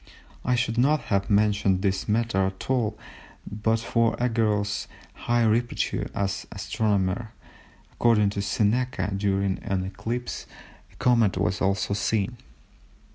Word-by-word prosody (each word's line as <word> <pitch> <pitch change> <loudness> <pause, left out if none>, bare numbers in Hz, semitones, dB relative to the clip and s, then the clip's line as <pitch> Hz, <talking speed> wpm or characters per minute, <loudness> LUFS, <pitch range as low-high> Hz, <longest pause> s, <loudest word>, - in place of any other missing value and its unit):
I 125 - +2
should 120 -1 0
not 150 +4 +4
have 100 0 +1
mentioned 100 -2 +2
this 95 0 0
matter 105 -3 +2
at 95 +6 -5
all, 110 -5 0 0.5
but 110 +2 0
for 115 0 +1
Arago's 105 -4 0 0.3
high 120 0 0
repute 115 +2 0
as 100 -1 -1
an - - -28
astronomer. 105 +1 -1 0.6
According 105 -4 +3
to 100 - -3
Seneca 115 +1 0
during 100 -1 0
an 95 -1 -2
eclipse 115 +6 -4 0.4
a - - -22
comet 115 -5 +3
was 90 +1 0
also 95 0 +1
seen. 105 +3 0
105 Hz, 130 wpm, -26 LUFS, 100-115 Hz, 0.6 s, not